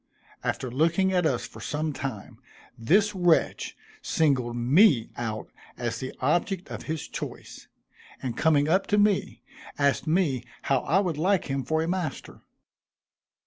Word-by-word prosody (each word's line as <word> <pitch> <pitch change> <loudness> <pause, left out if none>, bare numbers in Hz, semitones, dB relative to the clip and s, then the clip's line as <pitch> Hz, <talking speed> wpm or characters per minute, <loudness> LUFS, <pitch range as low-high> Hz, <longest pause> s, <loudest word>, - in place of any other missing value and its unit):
After 125 - -2
looking 170 +8 +2
at 180 -3 +3
us - - -1
for - - -11
some 150 0 -2
time, 120 -4 -6 0.4
this 200 - +2
wretch 175 -4 +1 0.2
singled 130 -7 +1
me 130 - +4
out 110 -2 -4 0.3
as 115 -1 -3
the 130 - -5
object 185 +1 0
of - - -6
his 160 -2 -3
choice, - - -8 0.5
and 125 -3 -4
coming 150 -2 +3
up 185 +5 +2
to 205 - +2
me, 205 -1 +1 0.3
asked 140 +2 +1
me 155 -7 +1 0.2
how 135 -1 +2
I 160 +8 +1
would 175 -6 0
like 190 +3 +2
him 135 -1 -1
for 160 +3 0
a - - -3
master. 175 -5 -4
155 Hz, 145 wpm, -26 LUFS, 130-180 Hz, 0.5 s, me